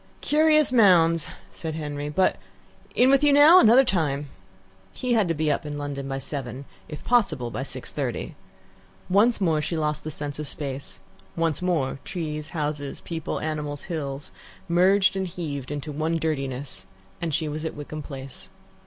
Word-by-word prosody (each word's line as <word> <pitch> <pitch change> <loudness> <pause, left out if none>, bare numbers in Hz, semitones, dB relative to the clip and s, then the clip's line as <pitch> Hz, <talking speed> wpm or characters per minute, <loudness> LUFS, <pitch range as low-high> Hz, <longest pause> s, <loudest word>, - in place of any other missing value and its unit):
"Curious 305 -1 +4
mounds," 170 -9 +5 0.2
said, 160 -2 -5
Henry, 145 -2 -4
"but 185 +5 +2 0.6
in 255 +2 +5
with 275 +1 +4
you 290 - +6
now; 295 +6 +8
another 240 +1 +7
time." 145 - 0 0.6
He 250 -1 -1
had 215 -5 +3
to 165 - 0
be 155 0 +1
up 145 - -1
in 145 -1 -5
London 140 -1 -4
by 135 0 -3
seven 135 -1 -5 0.2
if 150 - -8
possible, 160 - +1
by - - -4
six - - -6
thirty. - - -3 0.8
Once 220 +5 +4
more 165 -6 +2
she 165 +2 -2
lost 150 -1 -1
the 155 - -4
sense 145 -1 -6
of 150 - -4
space; 135 - -5 0.4
once 165 -1 0
more 160 -7 0
trees, 155 -3 -4
houses, 150 -3 -3
people, 165 -2 -4
animals, 150 -2 -3
hills, 140 - -5 0.4
merged 190 +3 +4
and 190 -1 -1
heaved 150 -6 -5
into 145 +1 -4
one 160 +3 -1
dirtiness, 135 -9 -3 0.3
and 165 -1 -1
she 155 +2 -1
was 155 +1 -4
at 160 - -4
Wickham 150 +1 -6
Place. 135 -2 -8
155 Hz, 165 wpm, -25 LUFS, 145-180 Hz, 0.8 s, now